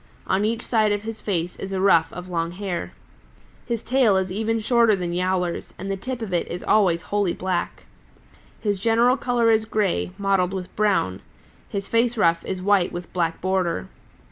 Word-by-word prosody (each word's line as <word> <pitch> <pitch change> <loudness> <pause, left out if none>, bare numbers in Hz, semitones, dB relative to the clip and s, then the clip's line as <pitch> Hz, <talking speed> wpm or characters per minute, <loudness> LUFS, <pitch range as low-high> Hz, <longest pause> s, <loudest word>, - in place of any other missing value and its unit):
On 195 - +1
each 230 +2 -1
side 215 -3 +2
of 205 0 -1
his 225 0 -6
face 175 -3 -2
is 195 - -6
a 190 - -1
ruff 170 -4 +4
of 180 0 -8
long 170 -1 -2
hair. 185 -2 -4 0.7
His 235 -3 -2
tail 245 -6 +3
is 190 -1 -1
even 220 +3 0
shorter 230 -1 +4
than 175 -2 -3
Yowler's, 180 -1 -1
and 195 +2 -4
the - - 0
tip 245 +4 -5
of 195 -4 -5
it 175 - 0
is 175 +1 -6
always 180 -6 +3
wholly 200 -4 0
black. 185 -1 -3 0.8
His 205 -3 -1
general 230 +4 +3
color 245 -3 +2
is 220 0 +2
gray, 210 -5 0
mottled 195 -2 +1
with 185 -1 -6
brown. 190 - +1 0.5
His 200 -1 -4
face 235 +1 +1
ruff 170 -5 +3
is 185 -1 -4
white 200 -2 +3
with 175 0 -7
black 165 -2 -1
border. 180 - -1
195 Hz, 185 wpm, -23 LUFS, 180-220 Hz, 0.8 s, ruff